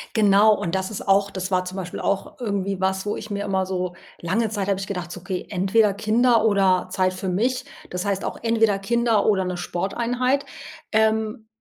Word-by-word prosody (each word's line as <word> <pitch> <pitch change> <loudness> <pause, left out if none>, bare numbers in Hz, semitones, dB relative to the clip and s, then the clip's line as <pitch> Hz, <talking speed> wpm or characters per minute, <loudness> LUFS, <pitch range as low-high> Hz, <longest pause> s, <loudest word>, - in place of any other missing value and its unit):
Genau, 210 0 +5
und 170 +2 -3
das 190 +1 -1
ist 205 - -6
auch 200 +1 +3
das 190 0 -4
war 185 0 +1
zum 185 +1 -6
Beispiel 180 -2 -5
auch 200 +5 -2
irgendwie 200 -4 -2
was, 190 +1 0
wo 205 - -1
ich 215 - -8
mir 200 0 -3
immer 190 -1 0
so 180 -1 -3 0.3
lange 215 +6 0
Zeit 205 -2 -3
hab 195 -1 +1
ich 195 - -5
gedacht 180 -3 -4
so: - - -7
„Okay, 180 0 -4
entweder 200 +2 +2
Kinder 225 +2 +3
oder 190 -3 +3
Zeit 185 0 +1
für 185 0 -4
mich.“ 250 +8 0 0.2
Das 180 +2 -4
heißt 200 -1 -1
auch - - -4
entweder 225 -3 +2
Kinder 230 0 +1
oder 190 -3 +2
'ne 180 -1 -3
Sporteinheit. 245 +10 -1 0.5
Ähm, 220 0 +1
200 Hz, 200 wpm, -23 LUFS, 185-220 Hz, 0.5 s, Genau